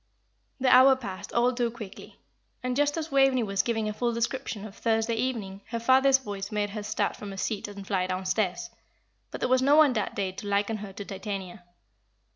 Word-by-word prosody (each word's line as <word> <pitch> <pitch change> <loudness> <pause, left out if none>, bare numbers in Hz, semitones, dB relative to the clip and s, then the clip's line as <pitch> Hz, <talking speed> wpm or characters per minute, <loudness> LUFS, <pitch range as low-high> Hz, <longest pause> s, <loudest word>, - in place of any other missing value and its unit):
The 255 -1 +5
hour 265 +1 +8
passed 200 -8 -7
all 245 +2 +2
too 240 -1 0
quickly, 220 -4 -10 0.5
and 250 0 -1
just 290 +2 +1
as 320 -1 -4
Waveney 270 -2 +4
was 200 -2 +1
giving 225 -2 -1
a 215 - -2
full 240 +2 0
description 235 -2 -3
of 205 - -10
Thursday 225 0 0
evening 225 -5 -3
her 235 - -3
father's 265 +3 +5
voice 205 -5 -6
made 205 -1 -1
her 210 0 -5
start 210 +1 -1
from 205 - -8
her 195 - -7
seat 210 +1 -2
and 200 -1 -9
fly 190 -2 0
downstairs; 185 0 -1 0.6
but - - -8
there - - +1
was 255 0 +3
no 280 +3 +5
one 305 -4 +6
that 215 -4 -2
day 195 -2 -1
to 205 +3 -8
liken 205 +2 0
her 205 -1 -8
to 200 +1 -8
Titania. 195 -3 -6
220 Hz, 205 wpm, -27 LUFS, 200-255 Hz, 0.6 s, hour